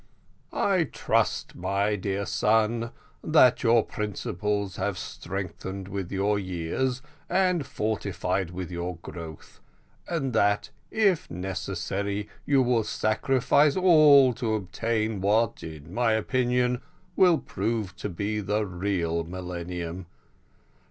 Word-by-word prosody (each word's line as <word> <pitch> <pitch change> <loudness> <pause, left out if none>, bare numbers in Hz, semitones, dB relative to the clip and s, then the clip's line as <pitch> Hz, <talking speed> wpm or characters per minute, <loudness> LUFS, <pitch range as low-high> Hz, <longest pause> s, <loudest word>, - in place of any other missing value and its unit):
"I 185 -4 +2
trust, - - 0
my 100 +3 0
dear 100 0 -2
son, 115 +3 +1 0.3
that 150 -6 +5
your 115 -1 +4
principles 105 -1 -3
have 95 0 -1
strengthened 95 +1 -6
with 95 -3 -5
your 100 +1 +1
years 95 +8 -2 0.3
and 180 -3 +2
fortified 100 -4 -2
with 90 0 -6
your 90 +1 -3
growth, 80 -3 -9 0.5
and 140 -7 -2
that, 105 -2 +2 0.2
if 200 -6 +2
necessary, 95 +3 -3 0.2
you 140 -2 +4
will 120 -2 +2
sacrifice 130 +6 +2
all 150 -8 +7
to 115 -2 -1
obtain 110 +1 -2
what 110 +3 +2
in 80 +1 -9
my 115 -1 +2
opinion 125 +2 +1 0.3
will 180 -3 +5
prove 105 -5 -3
to 105 - -4
be 100 +4 -2
the 105 +1 0
real 90 -3 -1
millennium. 90 0 -5
105 Hz, 110 wpm, -27 LUFS, 95-125 Hz, 0.5 s, all